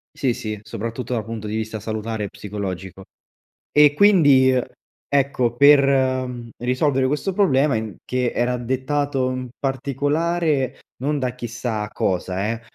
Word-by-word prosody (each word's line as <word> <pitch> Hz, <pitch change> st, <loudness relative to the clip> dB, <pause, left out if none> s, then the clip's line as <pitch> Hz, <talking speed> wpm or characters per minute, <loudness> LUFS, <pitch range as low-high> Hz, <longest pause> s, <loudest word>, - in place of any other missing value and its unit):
Sì, 130 Hz, -3 st, 0 dB
sì 110 Hz, -2 st, -5 dB
soprattutto 115 Hz, +2 st, -5 dB
dal 115 Hz, -3 st, -1 dB
punto 110 Hz, -1 st, -6 dB
di 105 Hz, -, -3 dB
vista 110 Hz, 0 st, -3 dB
salutare 110 Hz, 0 st, -3 dB
e -, -, -6 dB
psicologico. 95 Hz, -2 st, -6 dB, 0.7 s
E 150 Hz, -1 st, +6 dB
quindi, 145 Hz, -8 st, +5 dB, 0.5 s
ecco, 135 Hz, -4 st, +1 dB
per, 140 Hz, +1 st, +7 dB
ehm, 130 Hz, -3 st, 0 dB
risolvere 130 Hz, +2 st, +1 dB
questo 150 Hz, +7 st, -1 dB
problema 150 Hz, -, +3 dB
in 110 Hz, -4 st, -4 dB
che 125 Hz, -1 st, -1 dB
era 125 Hz, +1 st, 0 dB
dettato 130 Hz, +2 st, -1 dB
in 130 Hz, -1 st, -5 dB
particolare 145 Hz, +2 st, 0 dB, 0.2 s
non 145 Hz, +2 st, 0 dB
da 125 Hz, -1 st, -2 dB
chissà 120 Hz, -3 st, -4 dB
cosa 95 Hz, +3 st, -1 dB
eh, 115 Hz, 0 st, -5 dB
125 Hz, 135 wpm, -22 LUFS, 110-140 Hz, 0.7 s, per